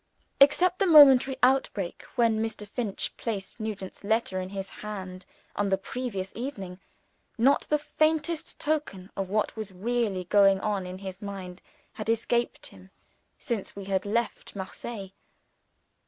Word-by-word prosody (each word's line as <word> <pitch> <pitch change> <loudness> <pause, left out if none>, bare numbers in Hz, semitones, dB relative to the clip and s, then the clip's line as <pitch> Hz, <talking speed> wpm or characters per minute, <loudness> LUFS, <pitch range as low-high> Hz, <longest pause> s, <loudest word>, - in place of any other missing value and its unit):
Except 355 +6 +5
the 390 - +3
momentary 270 -5 +8
outbreak, 250 -8 +2
when 230 -3 +3
Mr. 220 -2 -3
Finch 215 -2 -3
had - - -35
placed 205 -2 -4
Nugent's 205 -4 -5
letter 215 -2 0
in 185 0 -4
his 195 -1 -5
hand 190 -3 -7 0.3
on 205 -1 0
the 190 - +2
previous 195 -2 -5
evening, 195 -8 -6 0.6
not 265 +5 +3
the 300 - +4
faintest 310 +2 0
token 290 -12 -2
of 195 -1 -3
what 210 +1 0
was 215 -3 -6
really 205 -1 -1
going 195 +1 +5
on 200 -2 -2
in 180 +1 -6
his 190 0 -8
mind 190 -3 -7 0.3
had 215 0 -5
escaped 235 +1 0
him 95 0 -15 0.5
since 225 -5 -4
we 200 - -6
had 195 -1 0
left 220 +2 -2
Marseilles. 195 +1 -6
210 Hz, 145 wpm, -27 LUFS, 190-245 Hz, 0.6 s, momentary